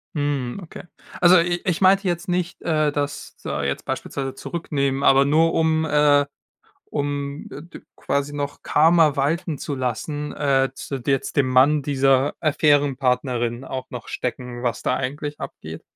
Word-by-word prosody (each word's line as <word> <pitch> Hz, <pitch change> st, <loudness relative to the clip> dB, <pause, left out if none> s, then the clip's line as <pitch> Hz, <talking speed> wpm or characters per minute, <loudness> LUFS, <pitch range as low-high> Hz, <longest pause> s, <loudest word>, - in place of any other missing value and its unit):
Hm, 145 Hz, -2 st, -2 dB
okay. 165 Hz, -, -10 dB, 0.4 s
Also 180 Hz, +1 st, +7 dB
i 175 Hz, +1 st, 0 dB
ich 175 Hz, -2 st, 0 dB
meinte 195 Hz, +1 st, +4 dB
jetzt 175 Hz, -1 st, -2 dB
nicht, 180 Hz, 0 st, -2 dB
äh, 155 Hz, -3 st, +1 dB
dass 145 Hz, 0 st, -4 dB
da 75 Hz, -, -3 dB
jetzt 70 Hz, 0 st, -3 dB
beispielsweise 135 Hz, -1 st, -4 dB
zurücknehmen, 140 Hz, -4 st, -2 dB
aber 135 Hz, 0 st, +5 dB
nur 160 Hz, +3 st, +3 dB
um, 160 Hz, 0 st, +2 dB
äh 145 Hz, -1 st, +4 dB, 0.6 s
um, 145 Hz, 0 st, -3 dB
äh, 145 Hz, -, -8 dB
d 170 Hz, -, -12 dB, 0.2 s
quasi 140 Hz, +1 st, -2 dB
noch 145 Hz, -1 st, -4 dB
Karma 160 Hz, -1 st, +4 dB
walten 160 Hz, +3 st, 0 dB
zu 145 Hz, -, -4 dB
lassen, 140 Hz, +4 st, -3 dB
äh, 135 Hz, -2 st, +1 dB
zu 135 Hz, 0 st, -6 dB
d 125 Hz, +3 st, -1 dB
jetzt 135 Hz, -, -1 dB
dem 140 Hz, -3 st, +3 dB
Mann 135 Hz, +4 st, +4 dB
dieser 135 Hz, 0 st, +2 dB
Affären-Partnerin 135 Hz, -5 st, +1 dB
auch 130 Hz, -1 st, -6 dB
noch 125 Hz, -2 st, -8 dB
stecken, 125 Hz, -1 st, -5 dB
was 120 Hz, -3 st, -2 dB
da -, -, +1 dB
eigentlich 145 Hz, +3 st, -4 dB
abgeht? -, -, -8 dB
145 Hz, 160 wpm, -22 LUFS, 135-155 Hz, 0.6 s, Also